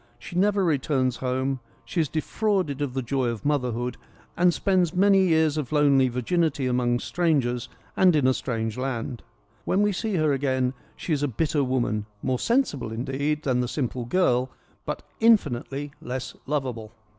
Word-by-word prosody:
She 125 +8 -10
never 200 +2 +3
returns 135 -5 +1
home; 130 +1 -1 0.3
she 165 +8 0
is 155 - -1
de 155 - -1
frauded 185 -8 -1
of 135 -3 -2
the 130 - -1
joy 130 +1 0
of 115 0 -4
motherhood, 125 -4 -1 0.4
and 175 0 +4
spends 180 -2 +1
many 195 0 +5
years 160 -2 +3
of 150 -3 -3
lonely 140 -3 +4
virginity 140 +3 0
among 125 -1 +1
strangers 135 -7 0 0.3
and 180 -3 +5
in 145 -4 +2
a 130 - +5
strange 115 -3 -3
land. 130 -1 -3 0.4
When 200 +2 +2
we 205 - +3
see 210 +2 -2
her 155 -3 +2
again 130 -2 0 0.2
she 165 - -3
is 145 - 0
a 145 - +1
bitter 145 +4 0
woman, 120 -5 -1 0.2
more 130 -1 0
sensible, 230 - 0
indeed, 140 +6 -2
than 130 -3 +1
the 125 - 0
simple 125 -2 -3
girl, 125 -4 +2 0.4
but - - -3 0.2
infinitely 145 - +2
less 130 +1 -5
lovable. 125 -7 -3
135 Hz, 170 wpm, -25 LUFS, 125-160 Hz, 0.4 s, many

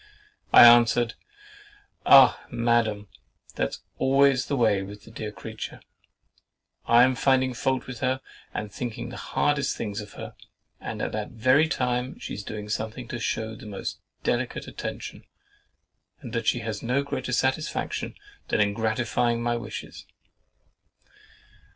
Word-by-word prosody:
I - - +10
answered, 120 0 +6 0.9
"Ah! 135 -2 +8
Madam, 115 -3 +1 0.5
that's - - -3 0.2
always 135 -1 +3
the 140 - 0
way 110 -6 +3
with 100 +1 -9
the 110 - -14
dear 110 -1 -5
creature. 110 +2 -8 1.1
I 120 +1 +7
am 130 +1 +4
finding 130 0 +2
fault 130 +2 -1
with 125 -3 -8
her 130 0 0 0.3
and 105 -1 -5
thinking 115 +1 -5
the - - -8
hardest 145 -2 0
things 105 -1 -4
of 105 - -11
her; - - -8 0.5
and - - -5
at - - -2
that 105 -1 -4
very 130 +6 +3
time 125 -3 -1
she's 105 - -6
doing 105 0 -6
something 110 +3 -4
to 120 - -4
shew 110 -1 -2
the 110 - -11
most 100 -2 -5 0.2
delicate - - -1
attention, - - -6 1.0
and - - -9
that 115 -1 -2
she 120 - +2
has 110 -2 -4
no 125 +4 0
greater 130 -2 -4
satisfaction 130 +5 -1 0.3
than - - 0
in 100 -1 +3
gratifying 115 +2 0
my 120 0 +1
wishes!" 115 -2 -7
120 Hz, 140 wpm, -26 LUFS, 110-130 Hz, 1.1 s, I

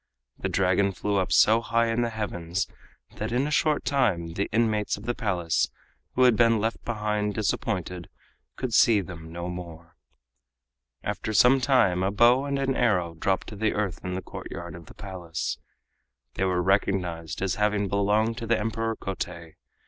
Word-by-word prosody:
The - - -2
Dragon 95 +1 +2
flew 100 +2 -1
up 95 - 0
so 110 +2 +5
high 115 0 +1
in 115 +1 +1
the 120 - 0
heavens 95 -5 -3 0.5
that 110 +2 -3
in 125 +3 +1
a 150 - -3
short 150 +1 +2
time 90 -12 +1
the 100 +3 -2
inmates 110 -2 +1
of 100 - -11
the 120 - 0
Palace, 90 -9 0 0.5
who 130 - +4
had 125 -3 +6
been 115 0 +4
left 115 +2 -2
behind 105 -2 -1
disappointed, 90 -4 -2 0.5
could 125 -3 -4
see 110 -2 +5
them 85 -3 -9
no 85 +1 -5
more. 85 -2 -8 1.1
After 110 - -3
some 130 +4 +6
time 120 -9 +3
a 95 - +2
bow 120 +6 +4
and 140 -1 -1
an 135 -1 0
arrow 90 -8 +1
dropped 95 +4 -1
to 105 - -8
the 105 +1 0
earth 100 -5 -2
in 90 0 -3
the 95 - -4
courtyard 85 -1 -7
of 85 0 -11
the - - -14
Palace. 90 -5 -5 0.7
They 95 - -1
were 90 -1 +1
recognized 90 -4 0
as 95 -2 0
having 105 -1 +2
belonged 105 +4 +1
to 115 - -5
the 115 0 +3
Emperor 115 +1 -2
Kotei. 85 -4 -6
100 Hz, 175 wpm, -26 LUFS, 90-115 Hz, 1.1 s, had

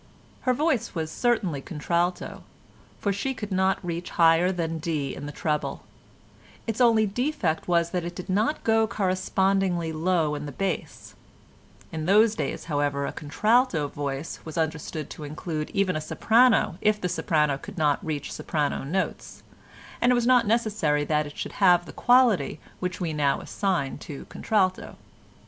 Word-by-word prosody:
Her - - +5
voice 275 - 0
was 160 -1 -3
certainly 215 - 0
contralto, 170 +4 -2 0.6
for 200 - 0
she 265 +7 -2
could 210 -3 -6
not 190 0 +2
reach 170 0 -4
higher 165 +2 +4
than 165 -3 -2
D 150 -4 -2
in 145 - -7
the - - -5
treble; 150 0 -2 0.8
its 225 +2 -2
only 225 -3 +5
defect 210 - -1
was 170 -1 +2
that 180 -2 -1
it 175 +1 -6
did 180 - -7
not 210 +10 0
go 225 0 +3
correspondingly 190 -3 0
low 160 -1 +1
in 150 0 -4
the - - -5
bass: 185 +4 -4 0.8
in 160 0 -4
those 210 +3 +5
days, 225 - -3
however, 145 -2 0
a - - -3
contralto 185 - +1
voice 140 +1 -4
was 160 0 -8
understood 160 -1 -2
to 155 - -8
include 155 +1 -4
even 195 -3 0
a 155 - -2
soprano 225 +3 +3
if 210 0 +2
the 180 - -1
soprano 150 -5 +1
could - - -10
not 150 -3 +1
reach 150 -3 -4
soprano 150 -4 -2
notes, 185 +8 -3 0.6
and 245 - +4
it - - +4
was 240 -1 +1
not 245 -3 +4
necessary 210 -10 +1
that 150 0 0
it 145 - -12
should - - -4
have 175 -2 +5
the - - -10
quality 245 - +3 0.2
which 180 0 -3
we 170 -4 -2
now 145 -2 +1
assign 175 -9 -2
to 145 -2 -8
contralto. 190 -4 0
175 Hz, 165 wpm, -26 LUFS, 155-210 Hz, 0.8 s, Her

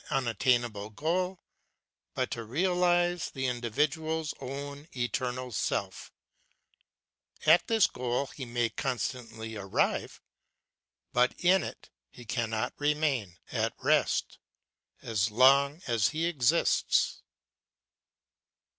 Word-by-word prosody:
1 135 - +1
75 - - -6
unattainable 120 -3 0
goal, 180 - -1 0.8
but - - -1
to 115 - -4
realize 175 - +1
the 130 -2 -4
individual's 150 +6 -1
own 140 +2 -6
eternal 125 0 -2
self; 105 - -2 1.3
at 160 +3 +6
this 225 -3 +4
goal 125 +2 -1
he 135 - -9
may 120 -1 0
constantly 115 -3 -4
arrive, 100 -2 -1 0.9
but 125 +1 +3
in 185 +2 +4
it - - -8 0.2
he 120 - -13
cannot 110 -1 -2
remain, 145 - 0
at - - -1
rest, - - +1 0.6
as 110 -3 0
long 140 - +4
as 115 -5 +2
he 160 +2 -1
exists. 145 -9 +2
130 Hz, 100 wpm, -29 LUFS, 120-155 Hz, 1.3 s, at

